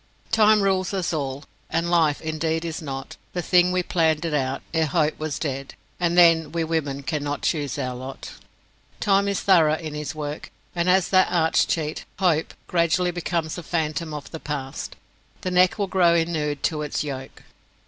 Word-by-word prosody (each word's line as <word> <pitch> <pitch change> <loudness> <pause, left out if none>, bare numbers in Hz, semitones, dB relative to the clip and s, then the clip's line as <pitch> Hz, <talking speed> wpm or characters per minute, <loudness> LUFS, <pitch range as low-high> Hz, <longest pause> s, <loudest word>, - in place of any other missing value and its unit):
"Time 215 -1 +5
rules 190 0 +1
us 180 -3 -1
all. 140 -2 -3 0.3
And 170 +2 -1
life, 160 -4 +3
indeed, 160 +1 -2
is 165 -1 -4
not 135 -3 -6 0.2
The 175 - -2
thing 180 +1 +4
we 180 0 +1
planned 160 -2 +1
it 165 - -2
out, 135 -2 -1
ere 160 -1 +2
hope 155 0 +1
was 155 -2 -3
dead; 135 -3 -4 0.2
And 175 0 +1
then, 165 -3 +6
we 165 0 -1
women 150 -4 -2
cannot 145 +1 -3
choose 145 -6 -1
our 130 0 -2
lot." 130 +2 -8 0.7
Time 200 0 +3
is 200 -1 -1
thorough 160 -5 +5
in 155 -2 -6
his 150 0 -5
work, 150 0 -5 0.2
and 175 +1 0
as 185 0 +3
that 185 -1 +5
arch 160 -2 +3
cheat, 155 -2 -2
Hope, 170 -5 +1
gradually 175 +1 +1
becomes 170 -1 -2
a - - -5
phantom 160 -1 -2
of 150 -2 -7
the 160 - -6
past, 135 -4 -5 0.5
the 185 - -2
neck 180 +2 +4
will 205 - 0
grow 180 -3 +3
inured 155 -4 -1
to 155 -2 0
its 150 0 -2
yoke. 135 -3 -7
160 Hz, 180 wpm, -24 LUFS, 150-175 Hz, 0.7 s, then